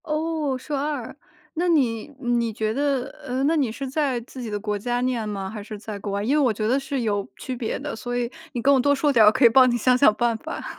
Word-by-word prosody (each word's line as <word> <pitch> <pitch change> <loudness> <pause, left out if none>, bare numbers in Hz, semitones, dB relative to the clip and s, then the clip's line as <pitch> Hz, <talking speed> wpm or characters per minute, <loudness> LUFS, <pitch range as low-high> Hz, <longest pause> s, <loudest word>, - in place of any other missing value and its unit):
哦， 310 -3 -1
硕 285 +3 -4
2， 280 -4 -3 0.4
那 350 +2 -1
你 250 -9 +1
你 240 -3 0
觉 215 0 -2
得 275 -1 0 0.2
呃， 255 +1 -2
那 310 +4 +3
你 275 -7 +1
是 270 +4 -5
在 270 -2 0
自 255 +2 -10
己 235 - -5
的 210 -1 -3
国 210 0 -2
家 240 +4 -2
念 245 -3 -1
吗？ 195 -2 -4
还 215 +1 -7
是 210 +1 -8
在 210 0 -7
国 200 0 -5
外， 200 +1 -2
因 260 +7 +1
为 - - +3
我 250 - +3
觉 215 0 -2
得 260 +4 +2
是 275 -1 -3
有 205 -3 -1
区 260 - -5
别 235 -2 -3
的， 285 -1 -5
所 245 +2 -4
以 240 0 -2 0.2
你 240 - -2
跟 280 +4 +5
我 270 - +4
多 285 +3 +3
说 285 +1 +1
点 230 -3 +6
儿， - - +7
我 - - +8
可 255 +2 +3
以 - - +9
帮 255 +2 +6
你 240 - +1
想 250 +2 +3
想 250 -5 +5
办 235 0 +1
法。 315 +8 -7
245 Hz, 290 characters per minute, -24 LUFS, 220-280 Hz, 0.4 s, 以